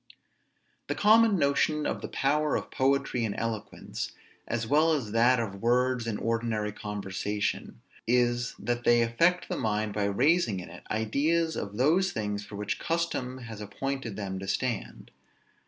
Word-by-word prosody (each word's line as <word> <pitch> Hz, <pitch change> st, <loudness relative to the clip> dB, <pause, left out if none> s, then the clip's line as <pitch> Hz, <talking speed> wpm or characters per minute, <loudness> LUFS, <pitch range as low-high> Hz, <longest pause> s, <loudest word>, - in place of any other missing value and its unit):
The -, -, -1 dB
common 220 Hz, 0 st, +5 dB
notion 150 Hz, +1 st, +2 dB
of -, -, -2 dB
the -, -, -4 dB
power 150 Hz, +2 st, +1 dB
of -, -, -4 dB
poetry 135 Hz, -2 st, +1 dB
and 110 Hz, -3 st, -2 dB
eloquence, 110 Hz, -2 st, -4 dB, 0.3 s
as 115 Hz, 0 st, -1 dB
well 155 Hz, +6 st, +4 dB
as 125 Hz, -9 st, -2 dB
that 120 Hz, +3 st, +4 dB
of 100 Hz, -4 st, -4 dB
words 125 Hz, 0 st, +2 dB
in 110 Hz, -2 st, -1 dB
ordinary 115 Hz, -2 st, -1 dB
conversation, 105 Hz, 0 st, -3 dB, 0.3 s
is, 120 Hz, 0 st, +2 dB
that 120 Hz, 0 st, -2 dB
they 120 Hz, -1 st, +5 dB
affect 170 Hz, +11 st, +2 dB
the -, -, -3 dB
mind 105 Hz, -1 st, -1 dB
by 105 Hz, -1 st, 0 dB
raising 120 Hz, -, +2 dB
in 90 Hz, -2 st, -9 dB
it 90 Hz, -, -11 dB
ideas 150 Hz, +10 st, +1 dB
of 100 Hz, 0 st, -5 dB
those 170 Hz, +9 st, +3 dB
things 105 Hz, -1 st, -2 dB
for 105 Hz, -, -10 dB
which 105 Hz, 0 st, -3 dB
custom 145 Hz, -6 st, -2 dB
has 110 Hz, -2 st, -8 dB
appointed 125 Hz, +2 st, -4 dB
them 95 Hz, -2 st, -4 dB
to 95 Hz, -, -7 dB
stand. 120 Hz, +2 st, -3 dB
120 Hz, 155 wpm, -28 LUFS, 105-140 Hz, 0.3 s, common